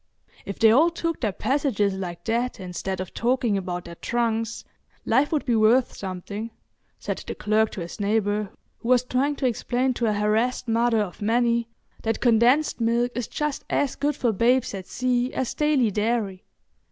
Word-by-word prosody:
"If 200 - -5
they 220 -1 +6
all 305 +9 +5
took 335 -1 -3
their 220 -4 +1
passages 215 -3 0
like 175 -3 -6
that 240 +2 -1
instead 185 +1 -4
of 185 -1 -6
talking 240 -2 +1
about 180 -2 -3
their 170 - -8
trunks, 230 +3 -2 0.4
life 290 +2 +2
would 305 -3 0
be 240 -3 +2
worth 225 +4 +4
something," 200 +4 -5 0.5
said - - -4
the - - -4
clerk 215 +1 +2
to 190 - -5
his 170 +4 -7
neighbour, 205 0 0 0.3
who 235 - -5
was 250 -1 +5
trying 265 +4 0
to 275 - -3
explain 250 +2 0
to 240 -1 -1
a 215 - +2
harassed 220 +5 0
mother 230 0 +2
of 195 -2 -5
many 235 +1 +2 0.3
that 225 0 -1
condensed 245 +4 +3
milk 235 +2 +1
is 245 -3 -3
just 300 -2 -3
as 285 -3 0
good 290 0 0
for 240 -4 +1
babes 235 +4 +2
at 190 -2 -6
sea 250 0 0
as 260 - -1
daily 290 -7 +2
dairy. 210 -2 -1
230 Hz, 175 wpm, -24 LUFS, 210-250 Hz, 0.5 s, they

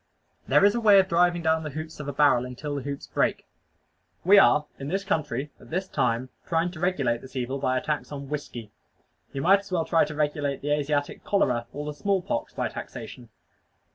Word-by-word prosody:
There - - +5
is 205 - +5
a 235 - -1
way 205 -3 +7
of 190 - +3
driving 175 -1 +2
down 160 0 +2
the 155 - -5
hoops 155 +2 -7
of 150 - -6
a - - -1
barrel 140 -3 +4
until 125 +4 -6
the 140 - -3
hoops 140 +1 -5
break. - - 0 0.8
We 200 +2 +8
are 150 -5 +5
in 135 - -5
this 195 +5 -1
country, 150 -8 -2
at - - -16
this 185 +4 -2
time, 125 -5 0 0.2
trying 165 +1 +1
to 170 - -10
regulate 140 -10 0
this 130 +1 -13
evil 130 +2 -2
by 130 -1 +1
a - - -1
tax 150 -1 -3
on 140 -1 -6
whiskey. 125 -7 -6 0.6
You 135 - -4
might 195 +3 +6
as 200 -1 -14
well 170 -3 0
try 165 - +3
to 150 0 -7
regulate 145 -2 -1
the 145 - -1
Asiatic 145 0 -1
cholera, 125 -12 +1
or 145 +1 -6
the 150 - -4
small 195 +3 0
pox, 115 - -3
by - - -2
taxation. 120 -2 -8
150 Hz, 215 wpm, -26 LUFS, 135-175 Hz, 0.8 s, We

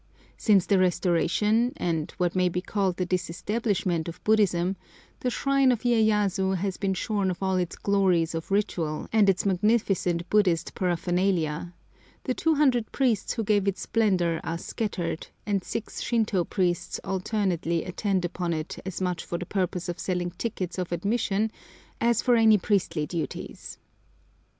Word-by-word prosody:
Since 200 -5 +3
the 200 -2 +3
restoration, 185 +6 +2
and 160 -3 -1
what 175 -1 0
may 180 -1 +3
be 180 - -2
called 190 -1 -1
the 180 - 0
disestablishment 185 0 -1
of 165 - -10
Buddhism, 195 -4 +2 0.4
the 250 - 0
shrine 275 +1 +2
of 240 - -1
Iyéyasu 210 -5 +2
has 190 +1 -2
been 195 -2 -1
shorn 200 -1 0
of 185 +1 -4
all 190 0 +1
its 180 -2 -2
glories 185 -5 +2
of 165 0 -5
ritual 175 -6 -1
and 210 -3 +5
its 190 0 +1
magnificent 190 -3 +1
Buddhist 185 -6 +2
paraphernalia; 175 -2 0 0.5
the 255 - -1
200 280 -7 +2
priests 245 -7 +1
who 225 - -2
gave 205 -1 +2
it 195 -1 +1
splendour 185 -7 +1
are 165 - -3
scattered, 175 -4 -3 0.2
and 200 -3 0
six 225 - -5
Shintô 220 -7 0
priests 180 -3 -1
alternately 185 -4 -1
attend 185 0 -1
upon 175 0 -2
it 155 0 -4
as 190 0 -5
much 180 -2 -1
for 170 - -4
the 180 - -5
purpose 180 -2 -2
of 175 0 -4
selling 180 -1 -2
tickets 185 -1 -4
of 180 -1 -3
admission 210 +3 0 0.5
as 235 -1 +2
for 245 -2 +4
any 220 -2 +6
priestly 180 -6 0
duties. 170 +1 -6
190 Hz, 150 wpm, -26 LUFS, 175-215 Hz, 0.5 s, any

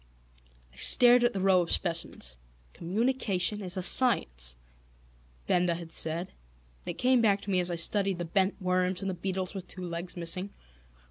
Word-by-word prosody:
I - - -21
stared 245 - +6
at 240 - +3
the 195 - -4
rows 185 -3 +2
of - - +2
specimens. 165 - -3 0.3
"Communication 210 0 -1
is 185 0 -5
a 185 - -2
science!" 60 - +3 0.9
Benda 175 -1 +1
had 165 -1 -9
said, 165 +3 -2
and - - -13
it - - -23
came 255 -1 +2
back 205 -3 +2
to 200 - -6
me 185 - +2
as 180 0 +1
I 175 - -2
studied 195 +3 0
the 175 - -4
bent 190 +4 0
worms 185 -1 -1
and 195 - -3
the - - -5
beetles 185 +1 -4
with 190 -2 -8
two 185 -1 -8
legs 175 +1 -6
missing. 175 +3 0
180 Hz, 180 wpm, -28 LUFS, 170-195 Hz, 0.9 s, stared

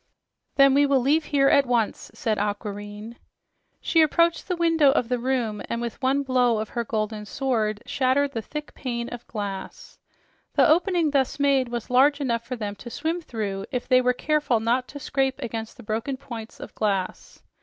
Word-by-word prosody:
"Then 275 -1 +6
we 285 +1 +4
will 275 -1 +3
leave 295 +5 +2
here 275 -2 +3
at 275 -1 +4
once," 235 -3 0
said 215 -3 -1
Aquareine. 205 +2 -5 0.6
She 325 - +3
approached 335 +2 +2
the 365 - -1
window 330 -4 +4
of 245 -4 0
the 250 -1 0
room 240 -4 -1
and 235 - -2
with 235 +2 -5
one 275 +2 +2
blow 250 -3 +2
of 215 0 -3
her 235 - -2
golden 215 -1 -3
sword 215 -5 -1
shattered 275 +2 +1
the 230 - -3
thick 300 +6 -7
pane 235 -3 -4
of 240 -1 -9
glass. 200 -3 -6 0.6
The - - +5
opening 335 -1 +3
thus 275 -1 0
made 275 -2 +3
was 240 0 -5
large 280 +3 +5
enough 235 -5 -1
for 255 - -3
them 210 -3 -4
to 240 - -9
swim 320 +8 -2
through 205 -8 -4
if 250 -1 -3
they 255 0 +5
were 250 0 +3
careful 290 -3 +1
not 240 +3 0
to 285 - -9
scrape 270 -2 -1
against 225 0 -5
the 245 - -12
broken 225 +6 -3
points 235 -5 -9
of - - -9
glass. 195 -3 -3
250 Hz, 185 wpm, -25 LUFS, 220-280 Hz, 0.6 s, Then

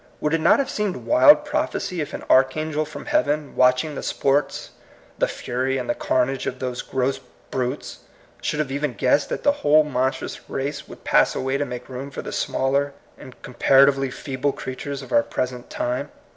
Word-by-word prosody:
Would 150 - -1
it 165 - +1
not - - +5
have 275 - 0
seemed 210 -3 -1
wild 300 -1 +6
prophecy 180 -3 -2
if 150 - -4
an - - -6
archangel 155 +4 +2
from 155 - -9
heaven, 155 - 0
watching 130 +4 +3
the - - -5
sports, 140 +1 0 0.5
the - - +3
fury, 130 +2 -2
and 125 -2 -4
the - - +1
carnage 130 +1 0
of 130 - -3
those 125 -1 -3
gross 135 +1 -1 0.3
brutes, 130 +2 -3 0.4
should - - -2
have 150 -3 -1
even 140 -2 -2
guessed 135 +3 +2
that - - -4
the 285 - +5
whole 150 +1 +5
monstrous 130 -2 -2
race 140 +1 -4
would - - -13
pass - - +3
away 130 +1 -1
to 145 - 0
make 125 -1 -7
room 130 +2 -6
for 140 - -7
the - - -6
smaller 140 +2 0 0.2
and 130 - -13
compara 135 +2 +5
tively 135 -1 -3
feeble 135 +1 -2
creatures 135 +1 -6
of 130 - -12
our 115 - +5
present 125 +1 -4
time 125 +4 -2
135 Hz, 185 wpm, -23 LUFS, 130-150 Hz, 0.5 s, wild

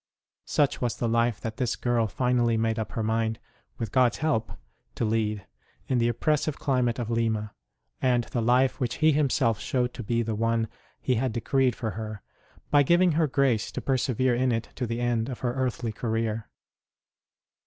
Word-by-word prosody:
Such 145 -2 +1
was 120 -2 0
the 120 - -1
life 115 -1 +1
that 110 -1 -5
this 125 -2 0
girl 120 -2 +1
finally 120 -1 +1
made 115 0 0
up 110 - -4
her 115 - -2
mind, 110 0 0 0.4
with 115 -4 -4
God 125 -2 +4
s - - -6
help, 155 -8 0 0.4
to 115 - -1
lead, 105 -2 -1 0.4
in 130 - +1
the 120 0 +2
oppres 150 +5 +1
sive 155 0 -3
climate 125 -4 +1
of 120 -2 -3
Lima; 110 -2 0 0.5
and 125 -2 +3
the 120 - -3
life 125 +3 +3
which 120 -2 -1
He 155 0 +4
Him 145 -1 +2
self 115 -6 +1
showed 125 -1 -1
to - - -6
be 115 +1 0
the 110 0 -2
one 115 +1 0 0.3
He 130 - +1
had 130 -4 -1
decreed 125 +2 +1
for 110 -3 -3
her, 110 0 -6 0.5
by 145 - +6
giving 175 +5 +4
her 160 0 +2
grace 130 -5 +1
to - - -3
persevere 130 -1 +1
in 125 +1 +1
it 115 -1 -2
to 125 - -3
the 115 +1 -3
end 120 0 0
of 125 - -6
her 120 -1 0
earthly 125 -3 -2
career. 110 0 -2
120 Hz, 195 wpm, -27 LUFS, 115-130 Hz, 0.5 s, by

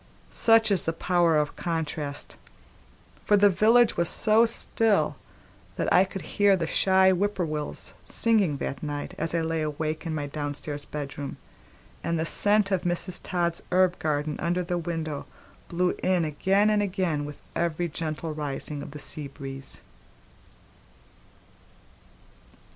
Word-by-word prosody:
Such 225 -1 +5
is 195 - +2
the 165 - 0
power 170 -1 +2
of 150 -1 -1
contrast; 150 -2 -4 0.9
for 205 - +4
the 205 0 +5
village 225 +5 +4
was 170 -1 +1
so 225 +1 +4
still 225 -2 +1 0.6
that - - 0
I 185 +2 +6
could 190 0 -7
hear 200 -1 +3
the 170 - -1
shy 190 +3 +4
whippoorwills 175 -6 -2
singing 205 -10 +2
that 135 -1 -4
night 145 -1 -5
as 165 +1 -2
I 165 - +1
lay 160 0 -1
awake 155 +1 -3
in 160 - -2
my 145 -2 -2
downstairs 145 0 -4
bedroom, 145 -1 -6 0.7
and 170 -1 -1
the 160 - 0
scent 205 +3 +5
of 190 -2 +1
Mrs. 175 +1 -1
Todd's 170 -2 -1
herb 185 0 +3
garden 150 -1 -1
under 175 +1 0
the 175 0 -2
window 160 -3 -4 0.4
blew 180 +1 +1
in 180 -3 +2
again 195 +7 +2
and 210 -1 +2
again 185 -7 -1
with 145 0 -7 0.2
every 170 0 -1
gentle 155 0 -4
rising 145 0 -4
of 145 - -8
the 150 - -9
seabreeze. 140 -2 -7
170 Hz, 140 wpm, -26 LUFS, 150-190 Hz, 0.9 s, I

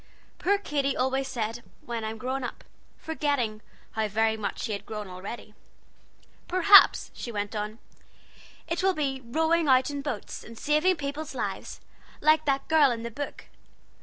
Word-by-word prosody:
(Poor 405 +2 +3
Katy 280 -8 -1
always 265 +1 0
said 230 -2 -3 0.2
"when 235 -2 -4
I'm 220 +1 -4
grown 260 +3 -3
up," 245 - -6 0.3
forgetting 285 -9 -1 0.3
how 220 -1 -1
very 220 +2 +1
much 215 -2 -4
she - - -3
had 200 -1 -3
grown 210 -1 -6
already.) 190 +4 -8 0.9
"Perhaps," 370 +3 +7
she 240 - -6
went 205 0 -3
on, 210 +1 -3 0.9
"it 335 +2 -1
will 380 0 +2
be 270 -3 -1
rowing 320 +6 +1
out 260 +1 +4
in 285 -1 -4
boats, 265 -7 -5
and 230 0 -12
saving 305 +8 +2
peoples' 295 +1 -5
lives, - - -4 0.4
like 310 0 +4
that 275 -1 0
girl 310 -3 +5
in 230 -2 -3
the 235 - -5
book. 285 +5 -6
265 Hz, 160 wpm, -27 LUFS, 220-300 Hz, 0.9 s, Perhaps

